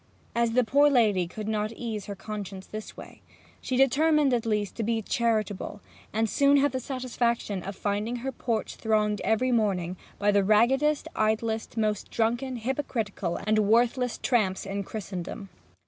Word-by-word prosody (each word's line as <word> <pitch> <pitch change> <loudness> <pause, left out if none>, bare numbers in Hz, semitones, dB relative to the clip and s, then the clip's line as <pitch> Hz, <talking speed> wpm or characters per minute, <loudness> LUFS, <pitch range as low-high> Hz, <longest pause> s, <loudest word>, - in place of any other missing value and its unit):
As 235 -1 +1
the 250 +1 +4
poor 285 +6 +4
lady 210 -9 +3
could 215 +4 -7
not 215 0 -1
ease 220 -3 -5
her 200 - -5
conscience 195 -2 -6
this 215 0 -8
way, - - -11 0.4
she 255 - -2
determined 290 +1 +4
at 235 -2 0
least 210 -2 0
to - - -1
be 225 0 0
charitable, 215 -3 -1 0.3
and 220 +1 +1
soon 280 +5 +4
had 285 +1 +3
the 260 - -2
satisfaction 240 -6 -2
of 195 +2 -6
finding 210 +4 -2
her 255 +3 -3
porch 230 -4 -3
thronged 215 -2 +1
every 250 +4 +2
morning 190 -6 0 0.2
by 205 0 +2
the 200 -1 +3
raggedest, 265 +9 +3
idlest, 220 +1 -1
most 215 -2 0
drunken, 240 +3 0
hypocritical, 225 -7 -2
and 215 0 +3
worthless 235 +3 +2
tramps 205 -8 +1
in 200 +1 -3
Christendom. 195 -1 -6
220 Hz, 160 wpm, -27 LUFS, 205-245 Hz, 0.4 s, the